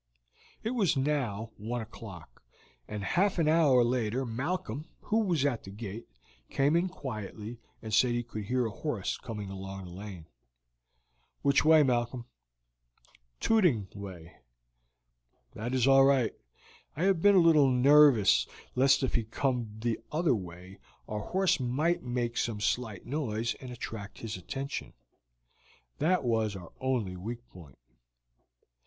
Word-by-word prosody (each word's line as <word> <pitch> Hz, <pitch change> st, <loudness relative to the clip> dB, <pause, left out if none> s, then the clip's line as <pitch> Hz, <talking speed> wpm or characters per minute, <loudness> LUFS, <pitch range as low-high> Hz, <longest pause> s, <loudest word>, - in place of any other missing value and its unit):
It 225 Hz, -, -1 dB
was 205 Hz, -, +1 dB
now 125 Hz, -7 st, -1 dB
one 115 Hz, +4 st, -3 dB
o'clock, 105 Hz, -6 st, -11 dB, 0.5 s
and 105 Hz, -1 st, -5 dB
half 195 Hz, -, +1 dB
an 165 Hz, -3 st, +2 dB
hour 150 Hz, -6 st, +5 dB
later 120 Hz, +1 st, 0 dB
Malcolm, 140 Hz, +3 st, -3 dB
who 220 Hz, -, +1 dB
was 175 Hz, -10 st, +1 dB
at 125 Hz, -6 st, 0 dB
the -, -, -10 dB
gate, 105 Hz, +2 st, -7 dB, 0.4 s
came 140 Hz, +3 st, +2 dB
in 175 Hz, +2 st, +2 dB
quietly 110 Hz, -, -7 dB, 0.2 s
and 110 Hz, -1 st, -6 dB
said 120 Hz, +3 st, +4 dB
he 120 Hz, 0 st, -1 dB
could 110 Hz, -3 st, -6 dB
hear 125 Hz, +3 st, +1 dB
a 110 Hz, -, -2 dB
horse 115 Hz, -4 st, -3 dB
coming 105 Hz, -4 st, -6 dB
along 95 Hz, 0 st, -7 dB
the 90 Hz, -, -10 dB
lane. 95 Hz, -3 st, -8 dB, 1.2 s
"Which 140 Hz, 0 st, +4 dB
way, 155 Hz, -1 st, +7 dB
Malcolm?" 120 Hz, -2 st, 0 dB, 1.2 s
"Tooting 165 Hz, -, +3 dB
way." 95 Hz, -5 st, -9 dB, 1.2 s
"That 120 Hz, +4 st, -3 dB
is 130 Hz, 0 st, +3 dB
all 135 Hz, 0 st, +7 dB
right. 135 Hz, -5 st, +3 dB, 0.6 s
I 155 Hz, -, -2 dB
have 190 Hz, -3 st, +3 dB
been 205 Hz, +1 st, +6 dB
a -, -, +6 dB
little 160 Hz, -5 st, +6 dB
nervous 130 Hz, -4 st, +6 dB, 0.3 s
lest 135 Hz, +1 st, +4 dB
if 130 Hz, -, 0 dB
he 115 Hz, -, +1 dB
came 115 Hz, -2 st, -2 dB
the 115 Hz, -1 st, -1 dB
other 155 Hz, 0 st, +2 dB
way 95 Hz, -1 st, -7 dB, 0.3 s
our 105 Hz, -, -3 dB
horse 190 Hz, -, +1 dB
might 145 Hz, +8 st, 0 dB
make 120 Hz, -1 st, -2 dB
some 115 Hz, -3 st, -1 dB
slight 110 Hz, -1 st, -2 dB
noise 120 Hz, -5 st, -2 dB
and 130 Hz, -, -8 dB
attract 110 Hz, -4 st, -7 dB
his 115 Hz, -2 st, -5 dB
attention; 135 Hz, +9 st, -5 dB, 1.1 s
that 175 Hz, +2 st, +2 dB
was 110 Hz, -4 st, 0 dB
our 90 Hz, -3 st, -9 dB
only 120 Hz, -8 st, -1 dB
weak 115 Hz, +6 st, -7 dB
point." 80 Hz, -8 st, -14 dB
120 Hz, 145 wpm, -30 LUFS, 105-145 Hz, 1.2 s, way